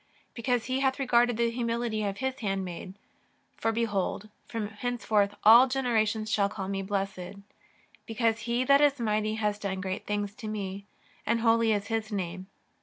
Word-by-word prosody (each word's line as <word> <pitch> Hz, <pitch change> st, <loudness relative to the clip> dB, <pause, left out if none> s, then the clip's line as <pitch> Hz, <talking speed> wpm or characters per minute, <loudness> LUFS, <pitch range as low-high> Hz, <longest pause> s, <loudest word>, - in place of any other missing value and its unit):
Because 245 Hz, 0 st, -1 dB
He 260 Hz, +1 st, -1 dB
hath 265 Hz, -1 st, +1 dB
regarded 245 Hz, -3 st, +3 dB
the 235 Hz, 0 st, +1 dB
humility 230 Hz, -2 st, -1 dB
of 200 Hz, -1 st, -2 dB
His 265 Hz, 0 st, -3 dB
handmaid; 190 Hz, -3 st, -4 dB, 0.6 s
for 225 Hz, -, 0 dB
behold 210 Hz, -2 st, -1 dB, 0.2 s
from 220 Hz, -3 st, -4 dB
henceforth 215 Hz, -3 st, 0 dB
all 235 Hz, +5 st, +9 dB
generations 220 Hz, -4 st, 0 dB
shall 200 Hz, -2 st, +2 dB
call 190 Hz, -2 st, -5 dB
me 195 Hz, 0 st, -2 dB
blessed. 195 Hz, -1 st, -3 dB, 0.7 s
Because 225 Hz, 0 st, 0 dB
He 240 Hz, +2 st, +1 dB
that 280 Hz, +2 st, +5 dB
is 285 Hz, -2 st, +3 dB
mighty 215 Hz, -1 st, 0 dB
hath 210 Hz, -1 st, -1 dB
done 195 Hz, -2 st, -3 dB
great 190 Hz, 0 st, -4 dB
things 205 Hz, -1 st, -2 dB
to 220 Hz, -, -7 dB
me, 200 Hz, -2 st, -5 dB, 0.4 s
and 230 Hz, 0 st, 0 dB
holy 230 Hz, -1 st, +3 dB
is 205 Hz, -1 st, 0 dB
His 225 Hz, -1 st, -2 dB
name. 185 Hz, -1 st, -4 dB
220 Hz, 165 wpm, -28 LUFS, 200-235 Hz, 0.7 s, all